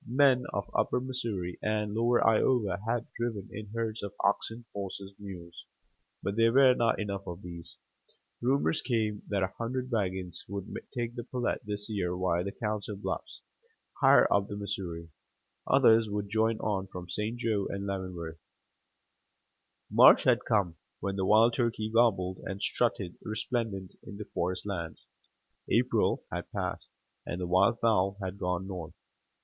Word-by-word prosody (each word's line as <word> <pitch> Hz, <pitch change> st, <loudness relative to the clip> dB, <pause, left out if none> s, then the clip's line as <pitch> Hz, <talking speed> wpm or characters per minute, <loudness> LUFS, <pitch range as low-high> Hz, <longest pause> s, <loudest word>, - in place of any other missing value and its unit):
Men 130 Hz, 0 st, +4 dB
of -, -, -2 dB
upper -, -, +2 dB
Missouri 115 Hz, -9 st, -4 dB
and 105 Hz, -1 st, -1 dB
lower 120 Hz, +2 st, +3 dB
Iowa 110 Hz, -4 st, +3 dB
had 115 Hz, 0 st, 0 dB
driven 115 Hz, -5 st, -3 dB
in 105 Hz, +1 st, -7 dB
herds 115 Hz, +1 st, -3 dB
of 100 Hz, -, -5 dB
oxen, 115 Hz, +4 st, 0 dB
horses, 100 Hz, 0 st, -6 dB
mules; 90 Hz, -4 st, -9 dB, 0.6 s
but 100 Hz, -, -1 dB
there 115 Hz, +1 st, +4 dB
were 130 Hz, 0 st, +7 dB
not 120 Hz, -2 st, +1 dB
enough 100 Hz, -2 st, -3 dB
of 90 Hz, +2 st, -6 dB
these. 85 Hz, -1 st, -9 dB, 0.6 s
Rumors 135 Hz, +5 st, +2 dB
came 110 Hz, -4 st, 0 dB
that 100 Hz, -2 st, 0 dB
a 95 Hz, -, -2 dB
hundred 125 Hz, +2 st, -2 dB
wagons 95 Hz, -5 st, -2 dB
would 100 Hz, 0 st, -6 dB, 0.2 s
take 120 Hz, -2 st, -3 dB
the 120 Hz, -1 st, -5 dB
Platte 125 Hz, 0 st, -2 dB
this 105 Hz, 0 st, -3 dB
year 90 Hz, -5 st, -1 dB
via 90 Hz, -1 st, +1 dB
the 100 Hz, -, -3 dB
Council 105 Hz, -1 st, -3 dB
Bluffs, 100 Hz, -, -5 dB, 0.6 s
higher 135 Hz, 0 st, +7 dB
up 100 Hz, 0 st, +2 dB
the 105 Hz, -, -5 dB
Missouri; 90 Hz, -5 st, -5 dB, 0.6 s
others 110 Hz, -1 st, +5 dB
would 100 Hz, -1 st, -3 dB
join 110 Hz, +1 st, +2 dB
on 95 Hz, -3 st, -1 dB
from 90 Hz, -2 st, -8 dB
St. 105 Hz, +5 st, -2 dB
Jo 110 Hz, -5 st, 0 dB
and 100 Hz, 0 st, -4 dB
Leavenworth. 90 Hz, -4 st, -4 dB, 1.5 s
March -, -, +8 dB
had -, -, +3 dB
come, 90 Hz, -6 st, +1 dB, 0.2 s
when 100 Hz, -1 st, -2 dB
the 95 Hz, -1 st, 0 dB
wild 110 Hz, +3 st, +6 dB
turkey 115 Hz, -3 st, -1 dB
gobbled 95 Hz, -6 st, +3 dB
and 95 Hz, +1 st, -4 dB
strutted 100 Hz, -6 st, 0 dB
resplendent 110 Hz, -3 st, -3 dB
in 100 Hz, -, -9 dB
the 105 Hz, -, -6 dB
forest 90 Hz, +2 st, -1 dB
lands. 85 Hz, -6 st, -5 dB, 0.6 s
April -, -, +2 dB
had -, -, -4 dB
passed, -, -, -3 dB, 0.3 s
and 90 Hz, -, -4 dB
the 90 Hz, -, -2 dB
wild 95 Hz, +6 st, +3 dB
fowl 100 Hz, -4 st, +2 dB
had 95 Hz, 0 st, -5 dB
gone 90 Hz, 0 st, -1 dB
north. 90 Hz, -3 st, -6 dB
105 Hz, 155 wpm, -30 LUFS, 95-115 Hz, 1.5 s, March